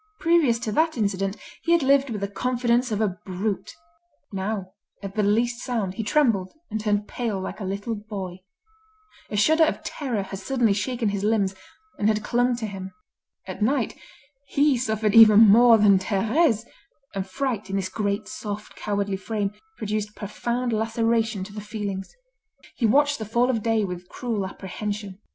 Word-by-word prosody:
Previous 330 -8 +3
to 230 -2 -4
that 315 +4 +1
incident 195 -1 -1 0.2
he 335 - +2
had 340 -4 +3
lived 275 0 +4
with 210 -4 -4
the 200 - -1
confidence 245 +3 0
of 210 0 0
a 190 -4 -1
brute; 195 +2 -3 0.6
now, 195 -1 -3 0.3
at 195 -1 -5
the 215 - 0
least 230 +4 +1
sound, 220 -7 -2
he 225 - -4
trembled 220 -6 +1 0.2
and 220 0 -2
turned 210 -1 0
pale 225 -5 -3
like 190 - -6
a - - -5
little 200 +4 -3
boy. 200 -4 -6 0.9
A 210 - -3
shudder 315 +10 +5
of 315 - 0
terror 245 -9 -3
had 195 0 -7
suddenly 230 +1 +1
shaken 225 +2 -1
his 200 -1 -3
limbs, 205 -3 +2 0.5
and 210 - +2
had 215 -1 +1
clung 245 0 +2
to 235 -2 -4
him. 190 -2 -6 0.5
At 185 +2 -7
night, 250 +1 +1 0.5
he 285 -1 +3
suffered 220 -3 0
even 215 -2 +9
more 230 +2 +8
than 205 -3 +5
Thérèse; 225 - +1 0.5
and 195 -1 -3
fright, 225 -1 -2
in 195 - -2
this 195 -1 -1
great, 200 0 -2
soft, 210 0 -6
cowardly 200 -1 -2
frame, 205 0 -2 0.2
produced 215 0 -3
profound 235 +4 -2
laceration 225 -1 0
to 200 +2 -9
the 210 - -6
feelings. 205 -2 -5 0.6
He 235 - +2
watched 285 +4 +3
the - - -3
fall 240 +4 +2
of 225 -3 -1
day 225 -1 +1
with 180 -2 -5
cruel 220 -6 -3
apprehension. 200 +1 -6
215 Hz, 170 wpm, -24 LUFS, 200-235 Hz, 0.9 s, even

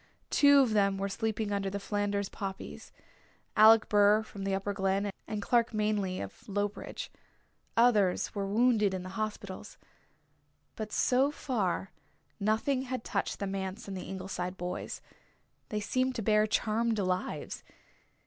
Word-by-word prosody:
Two 285 -1 +7
of 240 -5 +2
them 200 -2 +3
were 195 +1 -1
sleeping 220 +1 -2
under 200 -1 -1
the 200 +1 -4
Flanders 205 0 -1
poppies 195 -1 -7 0.6
Alec 220 +1 +7
Burr 205 +1 +5
from 200 -2 -8
the 195 -1 +1
Upper 195 +1 -2
Glen, 195 +1 0 0.2
and 210 -2 -3
Clark 235 0 +2
Manley 210 -3 0
of 100 - -8
Lowbridge. 205 +1 -3 0.7
Others 215 -6 +3
were 200 -1 -2
wounded 215 -2 +3
in 185 - -4
the 185 - -7
hospitals. 205 -1 -5 1.0
But 215 -1 -5
so 260 +3 +3
far 200 - -2 0.5
nothing 220 +6 +1
had 255 -3 -3
touched 200 - -2
the 200 - -3
manse 195 +3 -4
and 195 - -5
the 185 - -6
Ingleside 185 -1 -4
boys. 180 +1 -5 0.7
They 210 -4 -1
seemed 255 +5 0
to 225 - -3
bear 215 0 +3
charmed 225 +1 +1
lives. 185 -6 -2
205 Hz, 145 wpm, -30 LUFS, 195-220 Hz, 1.0 s, Two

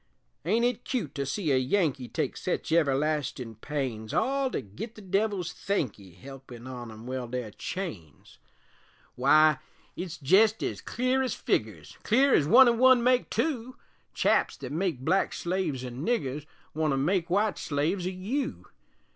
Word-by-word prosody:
Ain't 225 +7 +2
it 245 0 -1
cute 220 - -3
to 140 -1 -3
see 155 +1 -1
a 130 - +4
Yankee 135 -2 0
Take - - -2
sech - - -3
everlastin' 145 -5 0
pains, 130 -7 -3
All 275 0 +1
to - - -2
git 130 - -8
the 215 - -11
Devil's 195 -2 -1
thankee 110 - -3
Helpin' 130 +3 -11
on 125 -2 -7
'em 110 +1 -11
weld 125 -1 -5
their 125 -4 -3
chains? 100 - -7 0.8
Wy, 150 +3 +5 0.4
it's 175 -2 -5
jest 200 +9 +4
ez - - -3
clear 255 +2 0
ez 260 - -1
figgers, - - -2
Clear 265 +5 +3
ez 145 - +4
one 255 +8 +8
an' 235 -1 +2
one 255 -1 +6
make 250 0 +3
two, 255 -5 -2 0.4
Chaps - - +2
thet 130 -1 -7
make 165 -4 -1
black 185 +8 +1
slaves 170 -8 -2
o' - - -4
niggers 145 - -2 0.3
Want 155 -2 0
to - - 0
make 175 +5 0
wite 205 +3 +1
slaves 165 +6 -1
o' - - 0
you. 230 +10 -3
160 Hz, 160 wpm, -28 LUFS, 130-215 Hz, 0.8 s, one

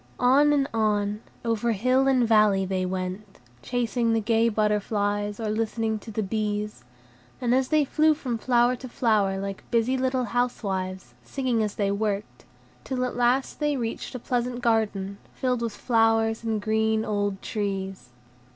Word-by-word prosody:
On 275 +4 +5
and 280 -2 +2
on, 210 -1 0 0.2
over 230 0 +1
hill 255 +6 +2
and 255 -3 +3
valley, 210 -3 +4
they 185 -1 -1
went, 190 +2 -5 0.2
chasing 240 - 0
the 225 - +2
gay 225 +1 +2
butterflies, 205 -1 0
or 220 -2 -2
listening 220 0 -1
to 215 - -11
the 220 0 -2
bees, 210 - -3 0.6
as 255 +1 +2
they 305 0 +3
flew 310 +3 +3
from 250 -6 -3
flower 245 +1 +3
to 255 +1 -9
flower 210 -5 +1
like 195 0 -5
busy 235 +2 +2
little 260 0 0
housewives, 195 -7 -2
singing 255 -4 -1
as 210 -1 -2
they 200 -2 0
worked; 205 0 -3 0.4
till 255 -1 -2
at 250 - -4
last 245 +2 +1
they 295 -2 +1
reached 230 +2 -4
a - - -4
pleasant 245 +1 -2
garden, 205 -4 0 0.2
filled 250 -2 0
with 230 -2 -2
flowers 225 -1 +2
and 220 -2 -1
green, 220 0 +1
old 205 -2 -1
trees. 195 - -4
225 Hz, 155 wpm, -26 LUFS, 205-245 Hz, 0.6 s, On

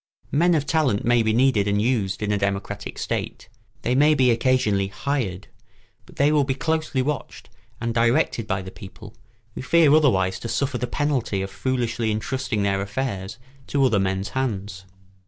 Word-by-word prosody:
Men 170 +4 +3
of 145 -2 0
talent 145 -10 +1
may 120 0 +4
be 110 -1 +1
needed 115 -3 +3
and 100 0 +1
used 105 -4 0
in 105 - 0
a 105 - +1
democratic 100 0 -3
state; - - -4 0.3
they 125 - +1
may 150 +4 +4
be 130 -3 +4
occasionally 115 -5 +1
hired; 105 -3 -3 0.6
but - - -16
they 145 +2 +3
will 150 -2 +3
be 135 -1 -1
closely 155 -3 -1
watched 145 -6 -5 0.3
and 115 -1 -2
directed 115 -1 +1
by 95 -1 -2
the 95 - -9
people, 105 +2 -12 0.4
who - - -6
fear 155 +2 +4
otherwise 95 -12 +3
to - - -6
suffer 125 +2 -1
the 125 - -2
penalty 125 -8 -1
of 95 - -6
foolishly 120 -3 -1
intrusting 110 0 -2
their 100 -1 0
affairs 100 -2 -4 0.3
to 140 -1 +2
other 110 -6 +2
men's 95 +1 -1
hands. 100 -7 -3
115 Hz, 175 wpm, -23 LUFS, 100-135 Hz, 0.6 s, may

